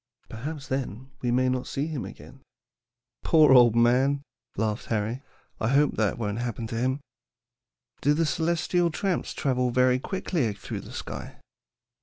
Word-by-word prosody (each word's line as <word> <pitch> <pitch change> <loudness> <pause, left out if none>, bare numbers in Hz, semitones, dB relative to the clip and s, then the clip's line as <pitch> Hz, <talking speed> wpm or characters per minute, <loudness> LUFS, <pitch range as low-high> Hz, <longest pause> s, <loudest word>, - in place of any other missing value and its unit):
Perhaps 145 +5 -6
then 130 -1 -4
we 125 - 0
may 130 +1 +2
not 130 0 -1
see 140 - -2
him 155 -5 -4
again." - - -12 0.8
"Poor 155 -4 +6
old 120 -3 +7
man," 130 +4 +3 0.3
laughed 105 0 -1
Harry. 115 +3 -1 0.4
"I 110 - 0
hope 140 +4 +4
that 110 -3 +1
won't 105 -1 -2
happen 120 -1 -3
to 115 - -4
him. 130 +4 0 1.0
Do 145 +1 +3
the 165 +1 +2
'celestial 170 +2 +1
tramps' 185 +2 -1
travel 125 -3 +1
very 125 +1 +3
quickly 160 - -1
through 100 - -6
the - - -11
sky?" - - -7
130 Hz, 150 wpm, -26 LUFS, 120-145 Hz, 1.0 s, old